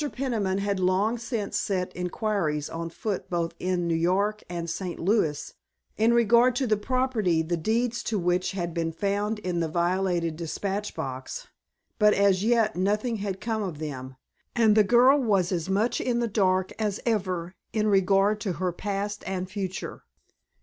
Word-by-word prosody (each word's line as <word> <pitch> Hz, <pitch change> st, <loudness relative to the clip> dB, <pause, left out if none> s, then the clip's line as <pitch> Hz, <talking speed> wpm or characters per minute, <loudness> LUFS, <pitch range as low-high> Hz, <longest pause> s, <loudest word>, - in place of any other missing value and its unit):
Peniman 225 Hz, -8 st, -1 dB
had 200 Hz, -1 st, -1 dB
long 195 Hz, +6 st, +1 dB
since 230 Hz, -3 st, -3 dB
set 185 Hz, -2 st, -2 dB
inquiries 180 Hz, -5 st, -1 dB
on 165 Hz, 0 st, -4 dB
foot 195 Hz, +4 st, -4 dB
both 170 Hz, -2 st, -1 dB
in 180 Hz, -1 st, -1 dB
New 170 Hz, -, +1 dB
York 195 Hz, +6 st, +1 dB
and 170 Hz, -1 st, -4 dB
St. 175 Hz, +1 st, -4 dB
Louis 165 Hz, -6 st, 0 dB, 0.4 s
in 225 Hz, +2 st, +3 dB
regard 235 Hz, +1 st, +4 dB
to 260 Hz, -, +1 dB
the 220 Hz, -3 st, +3 dB
property 215 Hz, -7 st, +1 dB
the 175 Hz, +2 st, -1 dB
deeds 230 Hz, +7 st, 0 dB
to 220 Hz, -, 0 dB
which 180 Hz, +1 st, 0 dB
had 175 Hz, -3 st, -3 dB
been 165 Hz, -1 st, -1 dB
found 205 Hz, +5 st, -1 dB
in 180 Hz, -4 st, -2 dB
the 165 Hz, -, 0 dB
violated 175 Hz, 0 st, 0 dB
dispatch 195 Hz, +5 st, -3 dB
box. 130 Hz, -1 st, -5 dB, 0.5 s
But 210 Hz, 0 st, +5 dB
as 200 Hz, -1 st, +3 dB
yet 225 Hz, -1 st, +2 dB
nothing 210 Hz, +6 st, 0 dB
had 195 Hz, -2 st, -4 dB
come 220 Hz, 0 st, -2 dB
of 180 Hz, -7 st, -4 dB
them, 130 Hz, -4 st, -6 dB, 0.4 s
and 225 Hz, -3 st, +4 dB
the 215 Hz, -, +6 dB
girl 245 Hz, +6 st, +5 dB
was 200 Hz, -8 st, +2 dB
as 175 Hz, -1 st, -2 dB
much 210 Hz, +5 st, +1 dB
in 245 Hz, -2 st, 0 dB
the 235 Hz, -, +1 dB
dark 190 Hz, -3 st, +1 dB
as 210 Hz, -2 st, -1 dB
ever 185 Hz, -6 st, -1 dB, 0.2 s
in 215 Hz, -1 st, 0 dB
regard 200 Hz, +1 st, +3 dB
to 200 Hz, -4 st, -1 dB
her 180 Hz, +2 st, -1 dB
past 205 Hz, +3 st, -3 dB
and 185 Hz, -1 st, -2 dB
future. 190 Hz, -2 st, -5 dB
195 Hz, 170 wpm, -26 LUFS, 175-215 Hz, 0.5 s, the